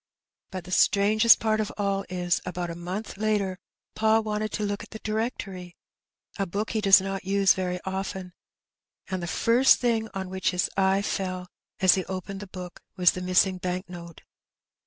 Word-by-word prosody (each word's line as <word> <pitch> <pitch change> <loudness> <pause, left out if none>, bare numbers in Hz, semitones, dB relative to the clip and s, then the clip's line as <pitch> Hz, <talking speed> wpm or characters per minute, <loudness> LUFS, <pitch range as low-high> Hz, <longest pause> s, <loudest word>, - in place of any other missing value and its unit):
But 185 -2 -6
the 180 - -11
strangest 210 +4 +5
part 220 -1 +1
of 215 - -2
aU 200 -1 -1
is, 175 -1 0
about 180 -1 -4
a - - -6
month 185 +5 -6
later 205 -3 0 0.3
pa 220 0 +3
wanted 215 0 -2
to 210 - -2
look 205 0 -2
at - - -11
the 220 - -8
Directory 210 -5 -4 0.3
— - - -24
a 195 - 0
book 205 +5 -3
he 220 - -1
does 195 -1 +7
not 195 0 -4
use 195 0 +3
very 180 -1 -3
often 190 -1 -4 0.4
— - - -53
and 185 -1 -2
the 175 - -4
first 240 +8 +4
thing 225 -3 0
on 190 -1 -4
which 190 -1 0
his 180 -1 0
eye 195 +1 +2
fell 185 -2 -3 0.3
as 185 -1 +7
he 190 - -1
opened 190 +1 -6
the 205 - -8
book 180 -1 -9
was 180 -2 +5
the 185 - -6
missing 185 +1 +2
bank 180 +1 -3
note. 170 -2 -10
190 Hz, 190 wpm, -26 LUFS, 180-210 Hz, 0.4 s, does